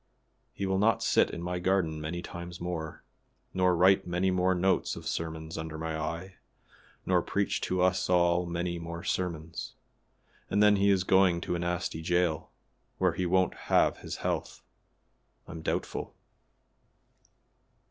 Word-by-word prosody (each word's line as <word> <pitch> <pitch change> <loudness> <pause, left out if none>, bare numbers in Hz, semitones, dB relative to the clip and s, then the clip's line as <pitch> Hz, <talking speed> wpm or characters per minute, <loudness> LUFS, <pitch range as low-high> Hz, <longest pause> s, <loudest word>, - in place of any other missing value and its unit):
"He 100 - -4
will 95 0 +1
not 110 +2 +3
sit - - +3
in 85 - -6
my 90 0 -2
garden 90 -4 0
many 85 +3 -4
times 85 +1 -8
more, 85 -3 -5 0.5
nor 90 -1 +3
write 95 +2 +4
many 90 +2 +1
more 90 0 +2
notes 95 +2 +1
of - - -9
sermons 80 -1 -4
under 80 -1 -5
my 80 0 -3
eye, 85 +4 -4 0.7
nor 90 -1 +3
preach 100 +3 -1
to 90 0 0
us 95 0 +1
all 85 0 +3
many 85 0 -2
more 85 +1 -6
sermons; 85 -4 -3 0.7
and - - 0
then 105 -1 +6
he 100 +1 +3
is 95 -2 +3
going 95 -2 +4
to - - -2
a 85 - -1
nasty 85 -2 -2
jail, 85 -1 0 0.5
where 90 -2 +2
he 90 +1 -1
won't 95 0 +2 0.2
have - - +4
his - - -6
health, - - -2 0.8
I'm 80 - -7
doubtful. - - -3
90 Hz, 150 wpm, -29 LUFS, 85-95 Hz, 0.8 s, then